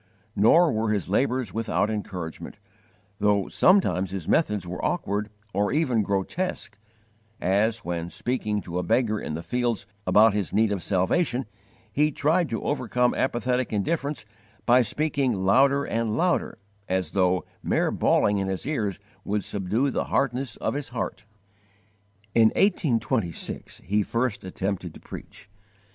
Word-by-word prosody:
Nor 160 - +5
were 110 -1 0
his 105 -5 -1
labours 125 +3 0
without 110 -1 0
encouragement, 90 -6 -5 0.6
though 100 -2 +2
sometimes 180 - +3
his 95 -4 -5
methods 105 - +1
were 90 - -5
awkward 105 - -1 0.2
or 100 +2 +1
even 135 -7 +2
grotesque, 100 - -2 0.6
as 105 +4 +1
when, 85 -1 -3
speaking 105 -2 -2
to 90 -1 -4
a - - 0
beggar 110 +3 +1
in 75 - -4
the 85 - -5
fields 120 -2 -1 0.2
about 110 0 +6
his 100 -2 -1
need 110 +1 +3
of 100 -3 -1
salvation, 120 - +1 0.5
he 150 +4 +3
tried 155 +3 +1
to 115 - -3
overcome 125 -3 +1
apathetic 125 -1 0
indifference 140 +6 -1 0.4
by 125 +1 +6
speaking 130 -5 0
louder 140 +7 +4
and 115 -1 -1
louder, 180 +1 +1 0.3
as 95 -3 -1
though, 90 -3 +2 0.2
mere - - +1
bawling 100 -1 +2
in 95 - -1
his 95 -1 -3
ears 110 - -1 0.3
would 105 0 -1
subdue 105 +8 0
the - - -1
hardness 135 -1 -1
of - - -2
his 145 0 -4
heart! 120 -2 -4 1.1
In 115 -1 +6
1826 120 - 0
he 105 +2 +2
first 115 +1 -1
attempted 95 -2 -4
to - - -11
_preach. - - -10
110 Hz, 140 wpm, -25 LUFS, 100-130 Hz, 1.1 s, about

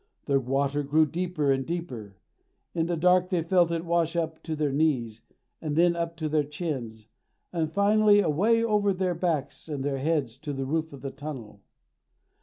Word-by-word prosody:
The 140 -1 +2
water 140 +3 0
grew 150 +3 +3
deeper 160 -2 -1
and 135 0 +1
deeper. 125 - -6 0.6
In 165 -1 0
the 170 -1 -1
dark 180 +2 +3
they 175 -4 0
felt 175 0 +3
it 170 0 -2
wash 170 -1 +1
up 160 -1 -2
to 160 -1 -4
their 150 -2 0
knees, 130 -7 0 0.4
and 150 -2 -2
then 170 +1 +4
up 170 0 -3
to 160 -1 -2
their 150 0 +2
chins, 140 -8 -5 0.5
and 160 -3 -1
finally 205 +2 +4
away 205 +7 +3
over 210 -3 +2
their 185 -1 0
backs 165 -3 -2
and 145 -3 -3
their 140 -1 -1
heads 135 -5 -1
to 145 0 -5
the 135 -1 -3
roof 160 +3 -1
of 140 - -11
the 135 - -5
tunnel. 135 -8 -8
160 Hz, 185 wpm, -27 LUFS, 140-175 Hz, 0.6 s, then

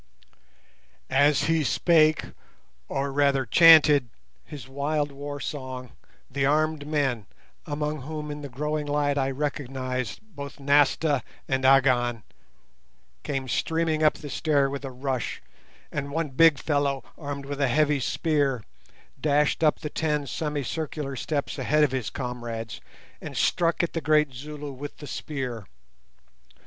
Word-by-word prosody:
As 140 +1 +4
he 160 0 +2
spake, 155 +4 +3 0.6
or 140 0 -2
rather 140 -1 +2
chanted, 150 -2 +7 0.3
his 140 -5 -10
wild 145 +2 -1
war 145 +1 -6
song, 130 -2 -6 0.4
the 135 +1 -2
armed 150 +1 +1
men, 135 - 0 0.4
among 150 0 -2
whom 150 +2 -5
in 145 0 -6
the 140 - -7
growing 150 +3 -2
light 145 -1 +1
I 135 0 +1
recognized 130 -4 -3
both 145 -10 -9
Nasta 145 0 +3 0.3
and 130 0 0
Agon, 125 -3 +4 1.0
came 135 -2 -3
streaming 160 +4 0
up 155 -1 +4
the 145 - -8
stair 140 -3 +1
with 140 0 -5
a 135 - -4
rush, 130 -4 -3 0.5
and 140 -1 -3
one 155 +1 -2
big 155 +2 +5
fellow, 140 -2 0
armed 140 -2 -6
with 145 0 -4
a 140 - +3
heavy 150 +3 +2
spear, 140 -3 0 0.6
dashed 150 +1 +2
up 150 - +3
the 150 -2 -5
ten 150 -2 -1
semicircular 150 -1 -3
steps 145 +1 -3
ahead 150 +4 +3
of 145 - +3
his 130 -3 -2
comrades 120 -4 -5 0.4
and - - -7
struck 170 0 +2
at 170 - -2
the 165 - -2
great 150 -2 +3
Zulu 145 +2 -7
with 140 +2 -8
the 145 - -9
spear. 125 - -5
145 Hz, 135 wpm, -26 LUFS, 135-150 Hz, 1.0 s, chanted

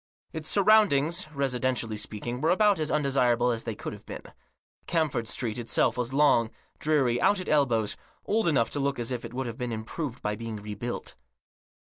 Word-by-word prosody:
Its 160 -1 -3
surroundings, 190 -6 +4
residentially 130 -5 -1
speaking, 110 +4 -4
were 160 - +2
about 200 0 +4
as 155 -1 0
undesirable 125 -4 +2
as 115 -1 -3
they 115 -2 -3
could - - -6
have - - -11
been. - - -8 0.6
Camford 155 -9 0
Street 115 -1 -2
itself 115 - +1
was 125 0 -2
long, 135 -5 +4 0.3
dreary, 135 -6 +2
out 205 - +3
at, 185 - -6
elbows, 120 -8 +2 0.3
old 220 -2 +1
enough 135 -8 +2
to 145 - -2
look 140 0 0
as 120 0 -3
if 125 -2 -3
it 115 - -7
would 125 -3 -3
be 125 - -1
improved 120 +4 -5
by 105 0 -1
being 115 0 -6
rebuilt. 105 +3 -5
125 Hz, 175 wpm, -27 LUFS, 115-155 Hz, 0.6 s, surroundings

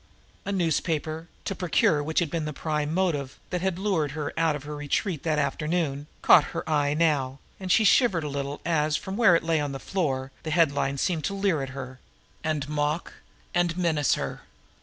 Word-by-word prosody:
A 200 - -2
newspaper, 160 -3 -1 0.2
to - - -1
procure 170 -4 +2
which 160 +2 -4
had 165 - -1
been 165 -2 -1
the 150 - -4
prime 150 0 -2
motive 160 -7 -1
that 180 -1 -1
had 190 -2 0
lured 180 -8 0
her 150 -2 -4
out 165 -2 +2
of 145 - -7
her 150 +1 -6
retreat 145 +3 -1
that 155 -2 0
afternoon, 150 0 -1 0.2
caught 150 - +7
her - - -3
eye 145 -2 +1
now, 145 -5 +1 0.2
and 185 -1 -3
she 220 - +5
shivered 200 - +4
a - - -3
little 140 0 -4
as, 155 -2 +2
from 190 +4 -6
where 205 -6 +6
it 165 - +1
lay 165 -1 +1
on 145 -2 -2
the 135 - -5
floor, 135 -9 -2
the 160 - -5
headlines 140 -4 +2
seemed 170 -5 0
to 200 - -2
leer 195 -5 +1
up 135 - -4
at 130 - -10
her, 130 -1 -7 0.4
and 155 -3 -1
mock, 150 +2 -1 0.4
and 175 -1 +1
menace 160 -6 +2
her. - - -4
155 Hz, 200 wpm, -26 LUFS, 145-175 Hz, 0.4 s, caught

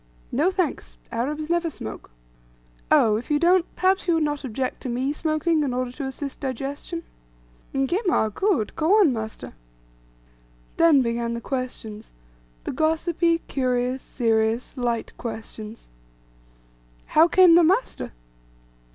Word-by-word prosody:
"No, 300 +8 +2
thanks! 370 -4 -2
Arabs 295 +7 -2
never 340 0 +1
smoke." 110 - -8 0.8
"Oh, 215 -2 +5
if 235 - -7
you 295 - +3
don't, 350 +2 +4
perhaps 375 0 +1
you 340 - +3
would 325 - +2
not 295 -1 -2
object 255 +1 -3
to 255 - -4
me 255 +4 -1
smoking, 310 +1 0
in 265 -4 -1
order 255 -1 -2
to 275 +2 -6
assist 270 +1 -6
digestion?" 280 +5 -4 0.7
"Ngema 270 - +1
good 385 - 0
go 335 +7 +3
on, 330 -11 +5
master." 220 -1 -6 1.2
Then 315 -5 +5
began 235 0 -1
the - - -3
questions, 235 -5 -5 0.5
the - - -3
gossipy, 330 +1 +1
curious, 255 -1 0
serious, 225 0 0
light 240 -3 -2
questions: 220 -1 -7 1.2
"How 320 +2 +6
came 360 -1 +6
the 345 +1 +7
master? 385 +10 +1
275 Hz, 130 wpm, -24 LUFS, 240-335 Hz, 1.2 s, the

